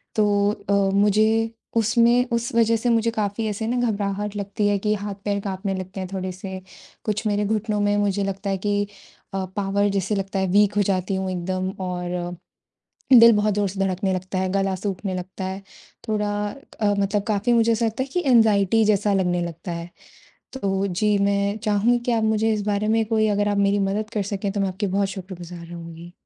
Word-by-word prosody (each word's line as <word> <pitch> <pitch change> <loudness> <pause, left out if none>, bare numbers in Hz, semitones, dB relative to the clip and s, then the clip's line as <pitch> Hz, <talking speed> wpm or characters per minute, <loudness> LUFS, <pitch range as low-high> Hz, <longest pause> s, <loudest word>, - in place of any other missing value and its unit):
तो 205 -1 +3
अ, 200 -1 -3 0.2
मुझे 215 +2 +3 0.3
उसमें 235 +2 +4
उस 235 0 -1
वज़ह 230 0 +4
से 240 +2 -1
मुझे 230 0 +2
काफ़ी 215 0 -2
ऐसे 215 +1 -3
ना 245 +1 0
घबराहट 205 0 -3
लगती 205 +1 -1
है 205 -1 +2
कि 210 +2 +1
हाथ-पैर 200 0 -3
काँपने 195 0 -3
लगते 185 +1 -6
हैं 185 -1 -4
थोड़े-से, 185 0 -5 0.4
कुछ 215 +1 -2
मेरे 205 0 +1
घुटनों 215 0 -1
में 205 0 +2
मुझे 205 -1 +1
लगता 195 +1 -3
है 195 - 0
कि 205 +1 0 0.5
अ, 190 -1 -1
पॉवर 200 0 +1
जैसे 195 +1 -1
लगता 195 0 -2
है 190 - +1
वीक 205 0 +4
हो - - +5
जाती 190 0 0
हूँ 190 0 -2
एकदम 185 +1 -2 0.2
और 180 0 -3 0.8
दिल 230 -1 +10
बहुत 210 0 +2
जोर-से 200 -1 -1
धड़कने 190 0 0
लगता 185 +1 -3
है, 185 0 0
गला 195 -1 0
सूखने 190 0 -3
लगता 185 +1 -6
है, 190 +1 -4 0.5
थोड़ा 210 -1 0 0.5
अ, 205 -1 +3
मतलब 200 +1 0
काफ़ी 215 +3 +1
मुझे 230 0 +4
ऐसा 230 +1 +1
लगता 225 +3 -1
है - - -8
कि 360 -1 0
एंग्जायटी 225 -4 +4
जैसा 205 -1 +2
लगने 180 -2 +1
लगता 170 +1 -6
है। 170 0 -5 0.6
तो 195 -6 -1
जी, 205 +3 +1
मैं 200 +1 +1
चाहूँगी 215 +3 +2
कि 245 - +1
आप 225 -2 +1
मुझे 220 0 +2
इस 210 - -1
बारे 210 0 0
में 225 +1 +3
कोई 220 -1 +2
अगर 205 0 +1
आप 205 - 0
मेरी 200 0 +2
मदद 200 +2 -1
कर 210 -2 0
सकें 200 0 -3
तो 205 - -3
मैं 195 - +1
आपकी 195 +2 -3
बहुत 195 +1 +1
शुक्रगुज़ार 180 -2 -8
रहूँगी। 170 0 -9
200 Hz, 195 wpm, -23 LUFS, 190-215 Hz, 0.8 s, दिल